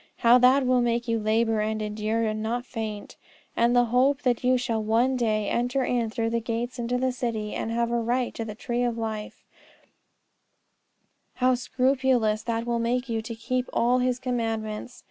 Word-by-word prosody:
how 240 +1 +6
that 260 +2 +5
will 250 0 +3
make 235 0 0
you 230 -1 +1
labour 220 +1 +1
and 215 0 -1
endure 215 +1 -1
and 215 -1 -1
not 240 +3 -2
faint! 220 -4 -6 0.4
And 235 +1 +3
the 245 0 +5
hope 270 +3 +3
that 245 -1 +1
you 255 +1 +4
shall 235 -3 -1
one 235 +5 +2
day 215 -4 0
enter 245 +3 0
in 240 -3 0
through 225 0 -2
the 235 - +1
gates 235 +2 -4
into 240 +1 -1
the 260 +1 0
city, 230 -4 -3
and - - -3
have 235 0 0
a 235 - +1
right 245 +2 -1
to 230 - -4
the 215 -2 -7
tree 240 +2 -2
of 240 -1 0
life, 220 -2 -5 1.9
how 255 0 +3
scrupulous 250 -3 +1
that 230 0 -2
will 235 -1 -1
make 245 +2 -1
you 225 -1 -1
to 230 +1 -7
keep 255 +2 -2
all 245 +2 +2
His 250 0 +1
commandments! 225 -2 -3
235 Hz, 185 wpm, -26 LUFS, 225-250 Hz, 1.9 s, how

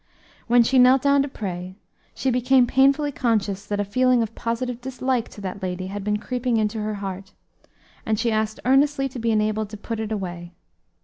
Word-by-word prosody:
When 240 0 +5
she 260 +3 +3
knelt 255 +1 +6
down 280 0 +4
to 280 - -1
pray, 185 -7 -6 0.4
she 265 - 0
became 250 +1 +4
painfully 275 +4 +3
conscious 210 -6 -1
that 205 0 -2
a 205 - 0
feeling 250 +3 +2
of 225 0 -6
positive 235 +2 -3
dislike 255 -1 -2
to 205 - -12
that 195 +1 -6
lady 185 0 -3
had 205 -1 -5
been 210 +1 0
creeping 245 +2 -1
into 215 0 -1
her 215 0 -3
heart, 195 0 -6 0.7
and 220 -1 0
she 235 0 +1
asked 215 0 -1
earnestly 270 +1 +3
to 250 - -8
be 230 0 -1
enabled 215 -1 0
to 215 - -8
put 225 +2 -5
it 220 0 -4
away. 175 -4 -5
225 Hz, 195 wpm, -23 LUFS, 205-255 Hz, 0.7 s, knelt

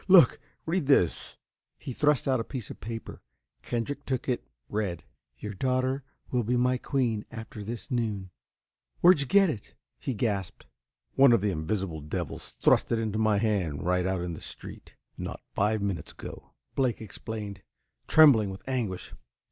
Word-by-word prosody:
Look! 185 -3 +7 0.3
Read 165 -3 0
this!" 115 - +2 0.4
He 130 - -6
thrust 150 0 +2
out 130 -2 +3
a - - -1
piece 125 -2 -6
of - - -10
paper. 115 0 -6 0.4
Kendrick 140 +5 -3
took 130 -3 -2
it, 125 -2 0 0.2
read: 100 -5 -2 0.3
Your 105 0 -5
daughter 130 +5 0 0.3
will 125 - +2
be 120 +2 +1
my 125 +1 +2
queen, 120 -7 0
after 110 -2 -8
this 115 +6 -6
noon. 105 -6 -1 0.7
"Where'd 175 -2 +7
you 140 - -1
get 195 +2 +5
it?" 105 -7 -9 0.2
he 130 - -3
gasped. 100 -4 -2 0.5
"One 135 -1 +7
of 115 - +4
the 105 -1 +1
invisible 80 0 -2
devils 75 +1 -5
thrust - - +4
it 115 - +3
into 110 -1 -1
my 110 -2 +3
hand 100 -9 0
right 90 +1 +2
out 95 -1 0
in 90 -1 -3
the - - -8
street, - - -8 0.2
not - - -5
five 105 +1 +1
minutes 100 -4 -3
ago," - - -10 0.2
Blake 130 -3 +1
explained, 105 -1 -6 0.5
trembling 135 -10 +7
with 95 +5 -9
anguish. 115 -9 -2
110 Hz, 165 wpm, -28 LUFS, 100-130 Hz, 0.7 s, Look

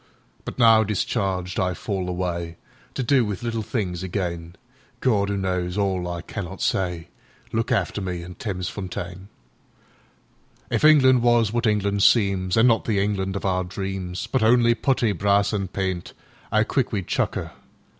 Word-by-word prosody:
But - - -6
now, 115 -2 +6
discharged, 95 -3 -1
I 90 -1 0
fall 95 -3 -3
awayTo 85 -2 -3 0.5
do 130 0 +4
with 105 -1 -4
little 115 -1 -2
things 100 -5 -3
again.…Gawd, 100 +6 -3
'oo 100 - -1
knows 90 -1 -2
all 95 -3 0
I 85 -1 -5
cannot 95 -1 -6
say, 90 -3 -1 0.4
Look 115 +1 -1
after 105 - 0
me 90 -2 -4
in 90 +1 -9
Thamesfontein! 90 -2 -5 1.4
If - - 0
England 130 -5 +6
was 120 -3 +3
what 120 0 +1
England 100 -1 +1
seemsAn' 100 0 +3
not 115 -2 +3
the 110 -3 0
England 95 -1 -1
of 100 - -4
our 95 -1 +1
dreams, 95 +1 -4
But 125 +3 -1
only 120 +1 +5
putty, 120 -2 +1
brass, 100 +1 +2
an' 100 -2 -1
paint,'Ow 95 +3 -3
quick 125 +3 -1
we'd 100 -5 -2
chuck - - -1
'er! - - -5
100 Hz, 145 wpm, -23 LUFS, 90-115 Hz, 1.4 s, now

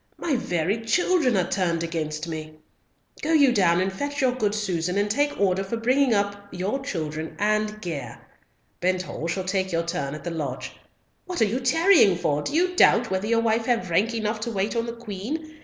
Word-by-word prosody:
My 300 - -1
very 185 -1 -1
children 300 - +2
are 180 -2 +1
turned 170 -3 0
against 155 -1 -3
me. 155 -1 -6 0.7
Go 320 - 0
you 285 -5 +6
down 180 -5 +3
and 190 +1 0
fetch 285 +8 -4
your 260 -2 +3
good 215 -5 -1
Susan, 180 -3 -1
and 205 0 +1
take 290 +5 0
order 195 -1 +2
for 195 +4 -3
bringing 255 +3 +2
up 200 -1 -1
your 190 +9 -2
children 160 - -4
and 215 0 0
gear. 150 -8 -5 0.6
Benthall 185 -2 -1
shall 185 +3 -2
take 190 0 -1
your 165 0 0
turn 150 -5 -3
at 155 - -9
the 175 - -4
lodge. 145 -6 -4 0.5
What 360 -1 -4
are 225 - +5
you 225 +5 -1
tarrying 265 - +4
for? 145 -3 0
Do - - -4
you 360 +2 +2
doubt 235 - +5
whether 190 +2 -1
your 230 0 +2
wife 225 0 +1
have 230 -8 0
rank 220 +7 +2
enough 215 0 -2
to 220 - -3
wait 205 +2 -1
on 230 0 -1
the 235 - -4
Queen? 240 +9 -6
205 Hz, 200 wpm, -25 LUFS, 175-240 Hz, 0.7 s, you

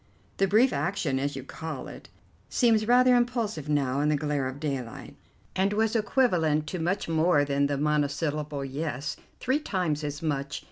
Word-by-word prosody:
"The 195 - +3
brief 225 +7 +4
action, 145 -3 -1
as 140 +1 -2
you 135 - -6
call 150 -1 -6
it, - - -11 0.4
seems 225 -3 +3
rather 250 +1 +6
impulsive 230 - -1
now 140 -2 +1
in 150 +1 +2
the 150 - +3
glare 145 -2 -1
of 130 +2 -6
daylight, 135 -6 -5 0.4
and 195 +2 +1
was 220 +1 +1
equivalent 180 - +2
to 180 - -4
much 180 +5 -1
more 160 -2 +3
than 140 0 +1
the 140 -1 -1
monosyllable 150 0 -1
'Yes'. 140 +1 -4 0.2
Three 260 +3 +1
times 180 - -1
as 150 +2 -4
much. 145 -2 -2
150 Hz, 170 wpm, -27 LUFS, 145-200 Hz, 0.4 s, rather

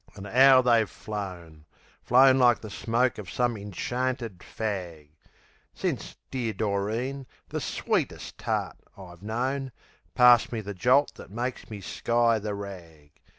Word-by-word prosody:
An' 100 -1 -9
'ow 130 +4 +6
they've 115 -3 +3
flown 90 -6 -7 0.4
Flown 130 +2 +5
like 120 -2 +5
the 110 - -8
smoke 115 +6 0
of 95 -5 -8
some 120 -1 0
inchanted 115 +2 -3
fag; 90 -9 -5 0.7
Since - - -3 0.2
dear 120 -4 -2
Doreen, 110 +7 -2 0.2
the - - -3
sweetest - - -2
tart - - -2 0.2
I've 90 -3 -12
known, 130 +5 -2 0.4
Passed 120 -1 +6
me 115 -2 -3
the 105 0 -6
jolt 125 +10 +3
that - - -11
made 120 +5 -4
me 105 -2 -7
sky 115 +3 +1
the 105 0 -4
rag. 85 -7 -10
110 Hz, 135 wpm, -27 LUFS, 100-125 Hz, 0.7 s, ow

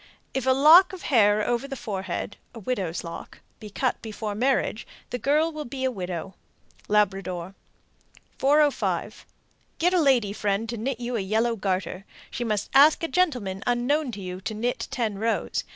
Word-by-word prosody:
If 265 -1 -2
a - - +6
lock 315 +8 +7
of 370 - -8
hair 210 -5 +3
over 240 +3 0
the 275 - -5
forehead 195 -5 -4 0.2
("widow's 195 -7 -3
lock") 170 -1 -9 0.2
be 210 - -9
cut 255 +5 -1
before 215 -1 -5
marriage, 245 0 0 0.2
the 245 - -3
girl 305 +5 +2
will 305 -1 -5
be 260 0 -6
a 260 - +1
widow. 185 -3 -5 0.5
Labrador. 195 -3 0 0.9
405. 290 +1 +1 0.5
Get 355 +2 +2
a 360 - +4
lady 245 -9 +3
friend 205 +1 -1
to 235 - -3
knit 245 +2 -3
you 245 0 -3
a - - 0
yellow 220 +4 0
garter. 190 -2 -3 0.3
She 245 - -3
must 210 -3 -2
ask 295 +5 +6
a - - +1
gentleman 250 - 0
unknown 250 +4 +1
to 205 - -7
you 185 0 -6
to 215 +2 -4
knit 240 +3 -2
ten 220 -5 -2
rows. 225 +1 -1
230 Hz, 170 wpm, -25 LUFS, 200-270 Hz, 0.9 s, lock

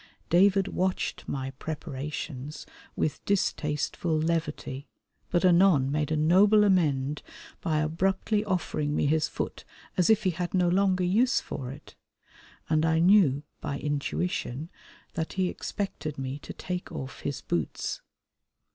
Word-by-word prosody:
David 195 +2 +5
watched 185 0 -1
my 135 -1 -3
preparations 150 -1 -5 0.3
with 155 0 -1
distasteful 155 -3 0
levity, 155 -4 -2 0.4
but 175 +1 +2
anon 170 -7 +5
made 150 0 0
a 155 - +2
noble 195 +7 +5
amend 150 -7 +2 0.4
by 155 -2 +1
abruptly 190 +6 +1
offering 160 -6 -1
me - - +1
his 155 +2 +2
foot - - -5 0.3
as 180 +1 +3
if 220 - +4
he 185 - +2
had 175 +2 -3
no 180 -1 +3
longer 185 0 +2
use 225 +9 +3
for 125 -2 -6
it, 140 +3 -11 0.7
and 155 0 +2
I 160 0 +3
knew 170 -6 +5 0.2
by 140 -2 -3
intuition 145 0 -2 0.4
that 160 -1 -3
he 185 -1 +1
expected 175 -8 -4
me 135 +1 -4
to - - -9
take 180 0 -5
off 135 +1 -6
his 140 -2 -4
boots. 85 -3 -2
160 Hz, 135 wpm, -28 LUFS, 145-185 Hz, 0.7 s, David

